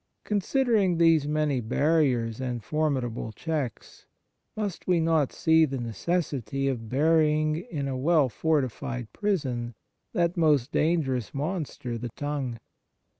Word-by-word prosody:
Considering 210 Hz, -3 st, +2 dB
these 165 Hz, -3 st, +4 dB
many 150 Hz, -3 st, 0 dB
barriers 125 Hz, -2 st, +1 dB
and 120 Hz, -3 st, -3 dB
for 155 Hz, 0 st, 0 dB
midable 120 Hz, -5 st, -3 dB
checks, 150 Hz, -7 st, -4 dB, 0.5 s
must 205 Hz, -4 st, -4 dB
we 180 Hz, -2 st, +3 dB
not 160 Hz, -4 st, +2 dB
see 160 Hz, 0 st, +4 dB
the 135 Hz, -3 st, 0 dB
necessity 135 Hz, -, -2 dB
of 115 Hz, -5 st, -3 dB
burying 155 Hz, +2 st, +3 dB
in 160 Hz, -, -4 dB
a 135 Hz, -, -2 dB
well 150 Hz, +2 st, +3 dB
fortified 130 Hz, -4 st, -2 dB
prison 130 Hz, -, -2 dB, 0.4 s
that 175 Hz, -4 st, +1 dB
most 150 Hz, -7 st, +2 dB
dangerous 140 Hz, -8 st, 0 dB
monster, 145 Hz, -6 st, -3 dB
the 120 Hz, -, -4 dB
tongue 145 Hz, -5 st, -3 dB
150 Hz, 125 wpm, -27 LUFS, 125-165 Hz, 0.5 s, these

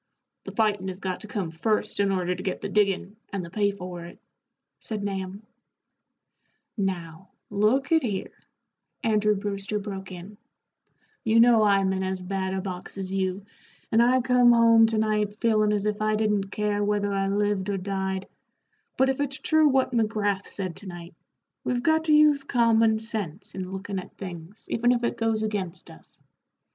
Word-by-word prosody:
"The -, -, -6 dB
fightin' 210 Hz, -4 st, 0 dB
has 185 Hz, 0 st, -5 dB
got 190 Hz, -2 st, -3 dB
to 215 Hz, -, -8 dB
come 195 Hz, -6 st, -3 dB
first 210 Hz, +8 st, 0 dB
in 200 Hz, -1 st, +2 dB
order 180 Hz, -1 st, 0 dB
to -, -, -6 dB
get 190 Hz, -, -3 dB
the 200 Hz, -, -5 dB
diggin', 200 Hz, 0 st, 0 dB
and 195 Hz, -3 st, -3 dB
the 170 Hz, -, -11 dB
pay 205 Hz, +1 st, +2 dB
for 180 Hz, -3 st, -7 dB
it," 170 Hz, -, -12 dB, 0.6 s
said 215 Hz, -2 st, -5 dB
Nahum. 195 Hz, 0 st, -4 dB, 1.3 s
"Now, 185 Hz, -4 st, -4 dB, 0.2 s
look 215 Hz, +8 st, +2 dB
at 325 Hz, -1 st, +5 dB
here," 205 Hz, -6 st, -3 dB, 0.7 s
Andrew 210 Hz, -1 st, +2 dB
Brewster 200 Hz, +1 st, -2 dB
broke 195 Hz, -2 st, -6 dB
in, 185 Hz, +3 st, -10 dB, 0.9 s
"you 225 Hz, 0 st, +3 dB
know 235 Hz, -1 st, +6 dB
I'm 195 Hz, -2 st, +3 dB
in 190 Hz, -, -2 dB
as 190 Hz, 0 st, -2 dB
bad 190 Hz, +1 st, -3 dB
a 190 Hz, -, -2 dB
box 185 Hz, 0 st, -6 dB
as 190 Hz, -1 st, -4 dB
you, 190 Hz, 0 st, -1 dB, 0.5 s
and 225 Hz, -, +5 dB
I 255 Hz, +2 st, +4 dB
come 250 Hz, -1 st, +5 dB
home 230 Hz, -1 st, +6 dB
to 225 Hz, -1 st, -1 dB
night 210 Hz, -1 st, 0 dB
feelin' 215 Hz, -3 st, +3 dB
as 205 Hz, -1 st, 0 dB
if 210 Hz, 0 st, -1 dB
I 215 Hz, 0 st, +2 dB
didn't 210 Hz, -2 st, 0 dB
care 205 Hz, 0 st, -1 dB
whether 205 Hz, -1 st, 0 dB
I 195 Hz, 0 st, 0 dB
lived 205 Hz, -1 st, 0 dB
or 200 Hz, -, 0 dB
died; 190 Hz, 0 st, -3 dB, 0.7 s
but 265 Hz, -, +4 dB
if 265 Hz, 0 st, 0 dB
it's 275 Hz, -2 st, -1 dB
true 315 Hz, -1 st, +3 dB
what 265 Hz, -2 st, +2 dB
McGrath 210 Hz, -4 st, 0 dB
said 185 Hz, -4 st, -4 dB
to 205 Hz, -, -10 dB
night, 175 Hz, -1 st, -9 dB, 0.5 s
we've 245 Hz, -1 st, -1 dB
got 320 Hz, 0 st, +2 dB
to 310 Hz, -, +3 dB
use 300 Hz, -2 st, +5 dB
common 230 Hz, -3 st, +3 dB
sense 215 Hz, -5 st, -5 dB
in 185 Hz, -1 st, -5 dB
lookin' 195 Hz, 0 st, -4 dB
at 185 Hz, -, -12 dB
things 180 Hz, +1 st, -9 dB
even 240 Hz, +2 st, +3 dB
if 240 Hz, 0 st, -1 dB
it 235 Hz, -, 0 dB
goes 225 Hz, -1 st, 0 dB
against 190 Hz, -5 st, -4 dB
us. -, -, -18 dB
205 Hz, 180 wpm, -26 LUFS, 190-225 Hz, 1.3 s, know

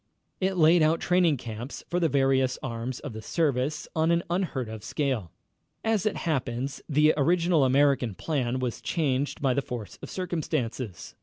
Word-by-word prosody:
It 190 Hz, 0 st, 0 dB
laid 165 Hz, +1 st, +6 dB
out 155 Hz, +2 st, +3 dB
training 175 Hz, -4 st, +3 dB
camps 120 Hz, +3 st, -7 dB
for 175 Hz, -, 0 dB
the 165 Hz, -2 st, +2 dB
various 135 Hz, -2 st, +2 dB
arms 120 Hz, 0 st, -4 dB
of 140 Hz, -6 st, -6 dB
the 110 Hz, -, -7 dB
service 145 Hz, +1 st, 0 dB
on 160 Hz, 0 st, +2 dB
an 170 Hz, 0 st, +2 dB
unheard 170 Hz, -, -1 dB
of 110 Hz, -1 st, -8 dB
scale. 125 Hz, -, -2 dB, 0.5 s
As 220 Hz, -2 st, +1 dB
it 215 Hz, -, 0 dB
happens, 135 Hz, -3 st, -2 dB
the 150 Hz, +1 st, +4 dB
original 170 Hz, +1 st, +3 dB
American 130 Hz, -4 st, +3 dB
plan 130 Hz, -, -1 dB
was 125 Hz, -2 st, -3 dB
changed 145 Hz, -3 st, -1 dB
by 130 Hz, -2 st, +3 dB
the 140 Hz, -, +1 dB
force 120 Hz, -5 st, -7 dB
of -, -, -8 dB
circumstances. 135 Hz, -, -3 dB
140 Hz, 165 wpm, -27 LUFS, 125-165 Hz, 0.5 s, laid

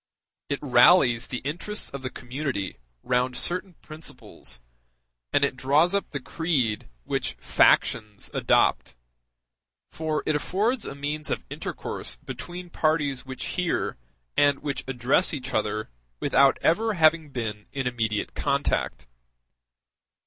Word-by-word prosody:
It 140 Hz, -, 0 dB
rallies 125 Hz, -2 st, +5 dB
the 125 Hz, -, -5 dB
interests 175 Hz, +9 st, -4 dB
of 140 Hz, -, -6 dB
the 130 Hz, -, -3 dB
community 130 Hz, -6 st, -4 dB, 0.3 s
round 125 Hz, 0 st, +1 dB
certain 180 Hz, 0 st, -2 dB
principles, 155 Hz, -, -9 dB, 0.7 s
and 140 Hz, -, +4 dB
it 140 Hz, -, -2 dB
draws 145 Hz, +8 st, +3 dB
up 200 Hz, -, 0 dB
the 145 Hz, -, -4 dB
creed 135 Hz, -7 st, -1 dB
which -, -, -2 dB
factions 110 Hz, -3 st, +2 dB
adopt; -, -, +2 dB, 1.0 s
for 155 Hz, -1 st, -2 dB
it 155 Hz, -, +1 dB
affords 215 Hz, -, 0 dB
a 135 Hz, -, -6 dB
means 145 Hz, +1 st, -3 dB
of -, -, -2 dB
intercourse 65 Hz, -, -4 dB
between 175 Hz, -, -8 dB
parties 150 Hz, -5 st, 0 dB
which 130 Hz, -1 st, -5 dB
hear, 180 Hz, -2 st, -1 dB, 0.4 s
and 145 Hz, -1 st, +4 dB
which 145 Hz, -2 st, -2 dB
address 135 Hz, +7 st, +2 dB
each 130 Hz, -1 st, -6 dB
other 110 Hz, -, -1 dB, 0.3 s
without 135 Hz, 0 st, +4 dB
ever 220 Hz, +6 st, +3 dB
having 160 Hz, -2 st, +4 dB
been 110 Hz, -5 st, -4 dB
in 135 Hz, -1 st, -3 dB
immediate 110 Hz, -4 st, -1 dB
contact. 140 Hz, -, 0 dB
140 Hz, 125 wpm, -26 LUFS, 125-160 Hz, 1.0 s, rallies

